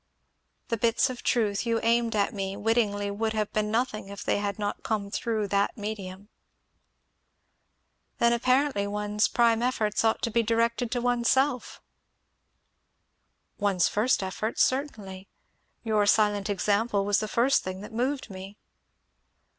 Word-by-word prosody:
The 230 - 0
bits 235 +4 +2
of 250 - -8
truth 210 -4 +1
you 230 -1 0
aimed 230 0 +2
at 200 -1 +1
me 195 -1 -4
wittingly 205 -2 0
would 220 +2 -2
have 215 -1 -2
been 210 0 0
nothing 220 -3 -1
if 200 0 -7
they - - 0
had 200 -1 -3
not 205 -1 -3
come 205 -2 -2
through 215 -2 -1
that 200 +3 0
medium." 205 -2 -6 1.9
"Then 235 0 +3
apparently 255 -3 +1
one's 210 +1 0
prime 235 -1 +2
efforts 220 -4 0
ought 225 0 +1
to 230 - 0
be 235 +2 +3
directed 230 +1 0
to 245 - -1
oneself." 245 +2 +1 1.8
"One's 195 -4 +2
first 215 0 +1
efforts, 205 +4 0
certainly. 210 -9 -3 0.6
Your 215 -3 +1
silent 205 -1 +2
example 205 +1 +1
was 205 0 +2
the 215 - -3
first 245 +5 +2
thing 185 +1 -5
that 210 - -10
moved 255 +4 -1
me." 190 +2 -9
215 Hz, 140 wpm, -27 LUFS, 205-235 Hz, 1.9 s, Then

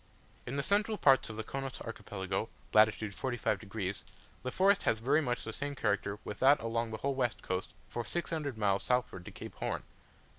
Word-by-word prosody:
In 125 - -3
the 140 - 0
central 210 +4 +2
parts 135 - +5
of 110 - -6
the 110 - -2
Chonos 135 +2 -4
Archipelago 100 -2 -3 0.2
(lat. 110 0 +8
45 110 +4 -2
degs.), 100 -2 -3 0.4
the 125 - -2
forest 195 +7 +4
has 110 - +2
very 140 +7 +3
much 125 -4 -1
the 110 - -5
same 145 +3 -3
character 100 -4 0
with 105 - -6
that 140 +3 +6
along 115 0 -1
the 110 - -4
whole 140 +4 0
west 125 -3 -1
coast, 95 +2 -3
for 120 - -3
600 155 -2 -2
miles 100 -2 +2
southward 125 -8 0
to - - -8
Cape - - -8
Horn. - - -2
120 Hz, 190 wpm, -33 LUFS, 110-140 Hz, 0.4 s, lat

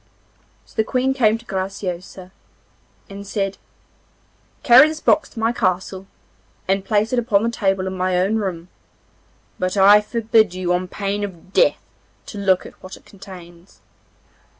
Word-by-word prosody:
So - - -22
the 220 - +2
Queen 255 +3 0
came 225 -4 +2
to 235 - -18
Graciosa, 185 -2 -5 0.8
and 200 0 -10
said: 195 -1 -3 1.0
'Carry 255 +4 +8
this 310 0 -5
box 310 - +2
to 230 - -10
my 225 +1 +1
castle, 190 -3 -2 0.6
and 195 0 0
place 215 +3 0
it 250 - +2
upon 220 -4 +1
the 230 - 0
table 195 -4 -1
in 190 0 -4
my 185 0 0
own 195 +5 +1
room. 180 -4 -4 0.9
But 185 +2 -2
I 205 +2 +7
forbid 220 -3 +1
you 180 -1 -1
on 180 +1 -1
pain 200 +2 -3
of 185 -1 -9
death - - +3 0.5
to 205 - -8
look 190 -2 +1
at - - -14
what 185 - -10
it - - -23
contains. 180 -2 -14
195 Hz, 155 wpm, -20 LUFS, 185-220 Hz, 1.0 s, Carry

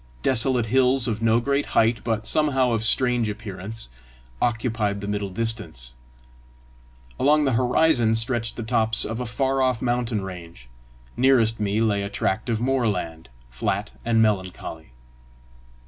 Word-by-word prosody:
Desolate 120 0 +3
hills 130 +1 +3
of 110 -1 -2
no 115 0 +3
great 140 +3 -1
height, 115 +1 +3
but 110 -2 -2
somehow 135 -4 +2
of 115 -2 0
strange 120 -1 +3
appearance, 105 - -7 0.5
occupied 115 -4 -1
the 100 - -6
middle 105 -1 -2
distance; 105 - -2 1.3
along 150 +2 +3
the 135 - +1
horizon 125 -1 +2
stretched 115 0 -1
the 115 - -5
tops 110 -1 0
of 115 +2 -4
a 125 - -4
far 135 +3 0
off 130 -3 +1
mountain 120 -4 -1
range; 85 -9 -10 0.5
nearest 120 -4 +3
me 105 0 0
lay 105 -3 +1
a 100 - -4
tract 100 +2 -2
of 115 -2 0
moorland, 105 - -2 0.2
flat 95 - -2
and 115 -1 +3
melancholy. 90 - -3
115 Hz, 140 wpm, -23 LUFS, 105-125 Hz, 1.3 s, Desolate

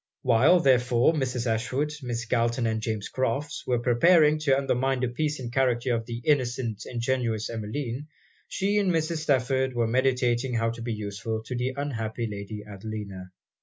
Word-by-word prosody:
While, 130 +8 +5
therefore, 125 0 +4
Mrs. 130 -5 -1
Ashwood, 125 +6 -1
Miss 120 -2 -3
Galton, 120 +1 +1
and 110 -1 0
James 110 -2 -3
Crofts, 135 +4 -2
were 125 - +2
preparing 150 +6 +4
to 140 -3 +3
undermine 135 -1 0
the 125 - +1
peace 150 +4 -2
and 120 -2 -6
character 125 -1 +1
of 115 -1 -2
the 120 0 -6
innocent, 120 -6 0
ingenuous 120 -3 -1
Emmeline, 115 +5 -4 0.4
she 205 +2 0
and 195 -3 +2
Mrs. 165 0 0
Stafford 130 -3 +1
were 120 -1 +2
meditating 125 0 +1
how 115 0 +1
to 115 0 -8
be 115 0 -3
useful 110 +1 -4
to 125 - -4
the 125 +2 -2
unhappy 115 -5 -3
Lady 105 0 -6
Adelina. 100 -2 -7
125 Hz, 165 wpm, -27 LUFS, 115-135 Hz, 0.4 s, While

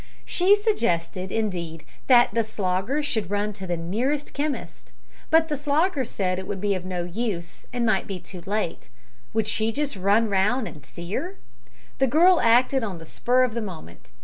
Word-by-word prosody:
She 375 +3 +4
suggested, 190 - -1
indeed, 175 -7 -3 0.2
that 240 -2 +6
the 230 - +2
Slogger 210 +6 -1
should 225 -10 -2
run 205 +1 -1
to 190 -1 -8
the 175 -1 -1
nearest 240 - -2
chemist, 290 0 -4 0.4
but 320 0 +5
the 300 - -1
Slogger 290 +1 +1
said 185 -4 -1
it 190 - -7
would 195 - -3
be 200 +1 +1
of 185 -2 -3
no 180 -1 -3
use, 175 -2 -4
and 240 -1 -1
might 220 - +1
be 195 -2 -4
too 180 0 -11
late. 205 -4 -2 0.5
Would 220 -2 +2
she 220 +1 +1
just 290 +2 -2
run 200 +4 +3
round 210 +5 +1
an' 150 -4 -10
see 170 +7 -8
her? 365 - -3 0.6
The 270 - +4
girl 340 +7 +5
acted 245 +3 +4
on 200 -5 -3
the 165 - -10
spur 250 +9 +2
of 250 -3 0
the 235 - -2
moment. 160 - -9
215 Hz, 185 wpm, -25 LUFS, 185-265 Hz, 0.6 s, that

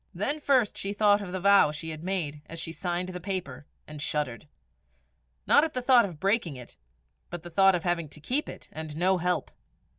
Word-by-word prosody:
Then 270 - 0
first 260 -7 +2
she 200 +1 -2
thought 205 0 +4
of 190 -3 -6
the 185 - -3
vow 200 -4 +5
she 160 +2 -6
had 155 0 -8
made 165 -6 -2
as 165 - -8
she 165 - -4
signed 175 +1 -3
the 180 -1 -6
paper, 185 -5 -4 0.2
and 150 -1 -9
shuddered 150 -3 -3 1.0
not 290 - +5
at 320 - -2
the 255 - -1
thought 245 -3 +6
of 170 -6 -8
breaking 195 - +1
it, 125 -2 -11 0.5
but 175 -1 -6
at - - -34
the 175 - -9
thought 195 +2 +5
of 170 - -3
having 170 -3 -1
to 150 - -11
keep 255 - -1
it, - - -10
and 155 -1 -7
no 185 +2 +2
help. 180 +1 -1
180 Hz, 215 wpm, -28 LUFS, 160-200 Hz, 1.0 s, thought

